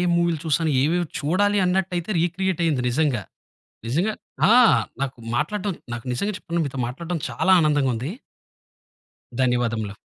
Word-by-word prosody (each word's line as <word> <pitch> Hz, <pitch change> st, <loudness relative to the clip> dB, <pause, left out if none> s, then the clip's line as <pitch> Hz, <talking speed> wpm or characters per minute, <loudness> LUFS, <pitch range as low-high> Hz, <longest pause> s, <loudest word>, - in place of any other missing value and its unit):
మూవీలు 170 Hz, -2 st, +1 dB
చూసాను, 160 Hz, +1 st, +1 dB
ఏవేవి 170 Hz, +4 st, +1 dB
చూడాలి. 200 Hz, +7 st, +1 dB
అన్నట్టయితే 180 Hz, 0 st, -1 dB
రీక్రియేట్ 180 Hz, +1 st, -1 dB
అయింది 150 Hz, -6 st, +1 dB
నిజంగా. 130 Hz, -4 st, 0 dB, 0.6 s
నిజంగా 175 Hz, -, 0 dB, 0.4 s
ఆ! -, -, +6 dB, 0.5 s
నాకు 135 Hz, -2 st, -3 dB, 0.2 s
మాట్లాడటం 195 Hz, +9 st, -1 dB, 0.2 s
నాకు 120 Hz, -2 st, -6 dB
నిజంగా 200 Hz, +12 st, -2 dB
చెప్తున్నా 170 Hz, -3 st, -3 dB
మీతో 135 Hz, -1 st, -5 dB
మాట్లాడటం 170 Hz, +8 st, -4 dB
చాలా 130 Hz, +10 st, +1 dB
ఆనందంగా 145 Hz, -4 st, +2 dB
ఉంది. 125 Hz, +8 st, -4 dB, 1.3 s
ధన్యవాదములు. 115 Hz, -5 st, 0 dB
160 Hz, 125 wpm, -23 LUFS, 130-180 Hz, 1.3 s, ఆ